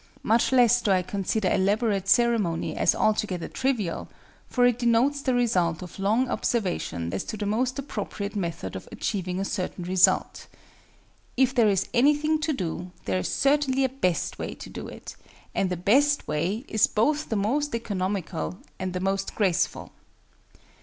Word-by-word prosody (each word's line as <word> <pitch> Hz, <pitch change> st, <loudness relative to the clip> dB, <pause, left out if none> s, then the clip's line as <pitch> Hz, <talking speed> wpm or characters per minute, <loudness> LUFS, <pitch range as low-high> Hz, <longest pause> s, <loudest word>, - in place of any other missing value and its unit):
Much 230 Hz, +3 st, +2 dB
less 245 Hz, -2 st, +5 dB
do -, -, -1 dB
I 185 Hz, -2 st, +3 dB
consider 195 Hz, +1 st, -1 dB
elaborate 200 Hz, 0 st, +1 dB
ceremony 225 Hz, -7 st, +2 dB
as -, -, +3 dB
altogether 210 Hz, -5 st, 0 dB
trivial; 240 Hz, -10 st, -2 dB, 0.4 s
for 245 Hz, -1 st, +3 dB
it 245 Hz, -1 st, +2 dB
denotes 245 Hz, +4 st, +2 dB
the 260 Hz, -2 st, 0 dB
result 180 Hz, -9 st, +1 dB
of 180 Hz, -, -11 dB
long 220 Hz, +6 st, +2 dB
observation 175 Hz, -, -2 dB
as 95 Hz, -, -2 dB
to 215 Hz, -, -5 dB
the 210 Hz, -, -3 dB
most 245 Hz, +5 st, 0 dB
appropriate 210 Hz, -6 st, -5 dB
method 170 Hz, -, -4 dB
of 95 Hz, -, -8 dB
achieving 185 Hz, -3 st, -3 dB
a 195 Hz, -, -1 dB
certain 185 Hz, -1 st, -3 dB
result. 185 Hz, +1 st, +2 dB, 0.9 s
If 260 Hz, 0 st, +3 dB
there 235 Hz, -5 st, +4 dB
is 195 Hz, -1 st, +1 dB
anything 300 Hz, +5 st, +3 dB
to 315 Hz, +1 st, 0 dB
do, 180 Hz, -, -4 dB, 0.2 s
there 95 Hz, -1 st, 0 dB
is 90 Hz, -, -2 dB
certainly 275 Hz, -1 st, +2 dB
a 265 Hz, -, +2 dB
best 185 Hz, -, -1 dB
way -, -, -4 dB
to -, -, -10 dB
do -, -, -7 dB
it, -, -, -10 dB, 0.4 s
and 190 Hz, -, 0 dB
the 180 Hz, -, -2 dB
best 280 Hz, -, +3 dB
way 185 Hz, -, -1 dB
is 220 Hz, -, +3 dB
both 295 Hz, +8 st, 0 dB
the 225 Hz, -, -1 dB
most 245 Hz, +7 st, 0 dB
economical 190 Hz, -5 st, -3 dB, 0.2 s
and 185 Hz, -1 st, -3 dB
the 180 Hz, -, -2 dB
most 195 Hz, +1 st, -2 dB
graceful. 190 Hz, -6 st, 0 dB
210 Hz, 165 wpm, -26 LUFS, 185-245 Hz, 0.9 s, less